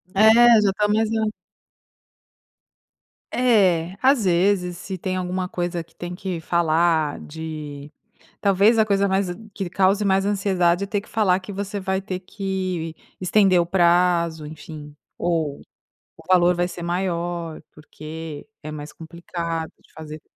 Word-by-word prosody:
É. 220 +3 +7 0.3
Já, 200 -2 +3
tá 210 +1 +1
mais 215 +1 +1
na 220 -1 +1 2.0
É. 190 -8 +3
Às 260 -4 +4
vezes. 180 0 +2
Se 190 +1 -6
tem 185 +1 -3
alguma 185 0 -2
coisa 175 -1 -3
que 165 - -29
tem 175 0 -6
que 185 -2 -4
falar 160 -2 +1
de 150 -2 -8 0.5
talvez, 200 +3 +4
a 220 - +5
coisa 200 -1 +1
mais 190 -1 +1 0.3
que 195 -3 -4
cause 195 +2 +2
mais 195 0 +2
ansiedade 190 -2 +1
é - - -5
ter 205 0 -1
que 205 - -18
falar 195 -4 +2
que 195 +2 -9
você 200 +1 -4
vai 190 0 -1
ter 185 -1 -5
que 185 -4 -4 0.3
estender 185 0 +4
o - - +2
prazo, 170 -3 +2
enfim. 150 -1 -10 0.2
Ou, 160 -5 -1 0.6
o - - -16
valor 180 -1 +5
vai 175 0 0
ser 175 -1 -8
maior, 170 -2 -3
porque 155 +1 -9
é 155 - -7
mais 150 0 -7
complicado 165 0 -5
de - - -26
fazer. 155 0 -9
180 Hz, 145 wpm, -23 LUFS, 165-195 Hz, 2.0 s, É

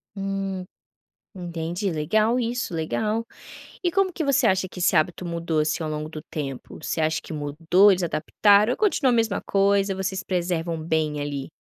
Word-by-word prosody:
Hum, 195 -1 -3 0.7
entendi. 175 +1 -3
Legal 215 +9 +1
isso, 240 -6 -2
legal. 215 +8 -1 0.6
E 350 -2 +1
como 390 -1 +2
que 325 -3 -3
você 280 -1 +2
acha 190 -1 +2
que 180 - -10
esse 175 0 +3
hábito 175 +3 +1
mudou, 170 -2 -1
assim, 150 +1 0
ao - - -3
longo 150 0 -4
do 155 -1 -7
tempo? 135 -5 -6
Você 160 - -2
acha 160 0 0
que - - -9
mudou, 160 +7 +3
eles 185 - 0
adaptaram 200 +7 +3
ou - - -2
continua 315 -11 +2
a - - +3
mesma 225 -3 +1
coisa, 200 0 +2
vocês 190 0 -3
preservam 170 -2 -1
bem 155 -2 0
ali? 145 -2 -4
180 Hz, 175 wpm, -24 LUFS, 160-205 Hz, 0.7 s, esse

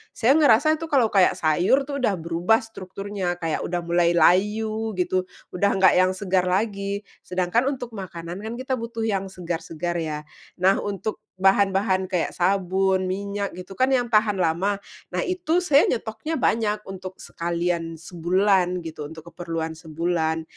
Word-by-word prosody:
Saya 260 +6 +4
ngerasa 295 +3 +5
tuh, 325 - -5
kalau 260 -7 +3
kayak, 195 -3 +5
sayur 175 - +2
tuh, 280 - -2
udah 210 -6 +1
berubah 170 +6 +1
strukturnya, 195 -3 -5
kayak 165 -2 -1
udah 175 0 -2
mulai 170 0 +2
layu 215 +5 +2
gitu, 185 0 0 0.3
udah 200 +3 +1
enggak 190 -1 +5
yang 185 0 +4
segar 185 -2 0
lagi. 200 +1 -1 0.2
Sedangkan 185 +7 0
untuk 245 -4 -3
makanan 175 -3 -7
kan, 220 +2 -5
kita 260 +1 -2
butuh 230 -1 -4
yang 195 -3 0
segar-segar 175 -1 -4
ya. 150 -2 -4 0.4
Nah, 190 +1 +4
untuk 205 +1 -4 0.2
bahan-bahan 195 0 +3
kayak 180 -3 -1
sabun, 190 +1 +1
minyak, 200 0 -3
gitu 185 +2 -10
kan, 255 +7 +1
yang 245 -2 +1
tahan 210 -1 +3
lama. 180 +4 +1 0.4
Nah, - - -1
itu 360 -1 0
saya 290 -4 +5
nyetoknya 230 +7 -3
banyak 215 -5 +1
untuk 190 -1 -8
sekalian 170 -1 -3
sebulan, 180 +2 +1
gitu, 155 -2 -6
untuk 160 +2 -11
keperluan 165 -1 -4
sebulan. 160 0 -2
190 Hz, 150 wpm, -24 LUFS, 175-220 Hz, 0.4 s, ngerasa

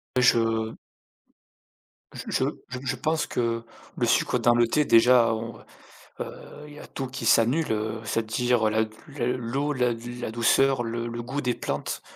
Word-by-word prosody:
Et 125 - +3
je 115 -2 +2 1.4
j - - -7
je - - +1 0.2
je 125 - -5
je 130 - -1
pense 155 +5 0
que 115 -1 -1 0.3
le - - +1
sucre - - +2
dans 120 0 +4
le 120 -1 +4
thé 150 +5 +2
déjà, 115 0 +6
heu, 110 - -3 0.8
heu, - - -5 0.3
il 150 - -12
y 150 - -11
a - - -11
tout 135 - -5
qui 125 -2 -6
s'annule, 120 +6 +3
heu, 110 +1 -2
c'est-à-dire 115 +1 +1
la 110 +1 +1 0.4
l 125 +1 0
l'eau, 135 +5 -2
la 125 -3 +1
d 120 +1 -8
la 110 - -3
douceur, 120 +2 +3
le 115 +1 -3
le 120 0 -5
goût 135 +5 -4
des 125 -2 0
plantes. - - -4
120 Hz, 180 wpm, -26 LUFS, 115-130 Hz, 1.4 s, déjà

